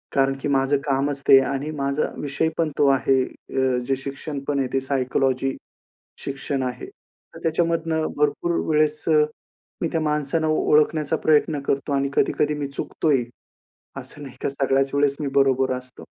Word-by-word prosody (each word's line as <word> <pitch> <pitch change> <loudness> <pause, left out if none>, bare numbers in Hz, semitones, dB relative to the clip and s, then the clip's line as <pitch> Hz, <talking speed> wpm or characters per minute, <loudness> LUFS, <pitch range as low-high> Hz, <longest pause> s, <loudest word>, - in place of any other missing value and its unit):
कारण 135 0 +3
की - - -2
माझं 135 0 +2
कामच 140 0 0
ते 135 - +9
आणि 140 +3 -3
माझा 140 +2 -1
विषयपण 160 +3 -1
तो 145 - +4
आहे. 135 -1 +3
अ, 130 -1 -2
जे 135 - +2
शिक्षणपण 140 +1 -4
आहे 130 - 0
ते 135 - +3
सायकॉलॉजी 135 0 0 0.7
शिक्षण 135 0 -3
आहे. 125 -1 -4
तर - - -19
त्याच्यामधनं 165 -1 0
भरपूर 150 +3 +1 0.2
वेळेस 155 0 +2
अ, 150 -1 +5 0.6
मी 165 - +1
त्या 165 - 0
माणसांना 150 +1 0
ओळखण्याचा 155 0 +2
प्रयत्न 150 -1 +3
करतो 140 +1 -1
आणि 140 0 +1
कधी-कधी 150 0 +1
मी 145 -1 -3
चुकतो 140 +3 -3
ही. 130 -4 +3 0.7
असं 145 - -9
नाही 135 - -10
का, - - 0
सगळ्याच 135 0 0
वेळेस 140 -1 +2
मी 145 - -1
बरोबर 135 -1 +3
असतो. 125 0 -12
140 Hz, 155 wpm, -23 LUFS, 135-150 Hz, 0.7 s, ते